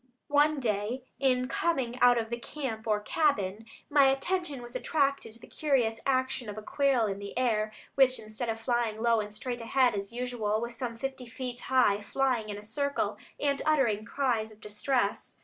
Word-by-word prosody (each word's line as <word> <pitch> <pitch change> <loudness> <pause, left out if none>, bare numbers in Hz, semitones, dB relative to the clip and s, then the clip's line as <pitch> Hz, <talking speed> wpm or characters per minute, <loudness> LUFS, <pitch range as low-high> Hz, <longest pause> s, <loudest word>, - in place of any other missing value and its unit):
One 295 +1 +4
day 225 +1 -1 0.2
in 255 -2 +2
coming 260 -6 -1
out 245 -1 +7
of 225 0 -2
the 235 - -2
camp 235 -5 -5
or 210 -1 +2
cabin, 220 -6 0 0.2
my 285 -2 +5
attention 280 0 0
was 240 0 -10
attracted 275 -3 0
to 230 - -11
the - - -12
curious 245 -7 0
action 260 -3 0
of 205 - -7
a 215 - -6
quail 270 -2 +2
in 200 -1 -3
the 200 +2 -7
air, 220 -4 +1 0.2
which, 260 -1 +4
instead 215 +2 -5
of 225 0 -2
flying 235 -2 0
low 230 0 +3
and 210 -1 -4
straight 240 +3 -4
ahead 250 +1 +3
as 200 0 -4
usual, 235 -3 -1
was 235 +1 -4
some 235 -1 -4
fifty 265 0 -5
feet 250 0 -5
high, 245 -6 +3
flying 240 0 0
in 205 - -4
a 205 - -9
circle, 280 +6 -1 0.2
and 280 -1 +1
uttering 260 -9 +2
cries 230 -3 -1
of 215 - -16
distress. 215 +5 -1
240 Hz, 185 wpm, -29 LUFS, 220-270 Hz, 0.2 s, out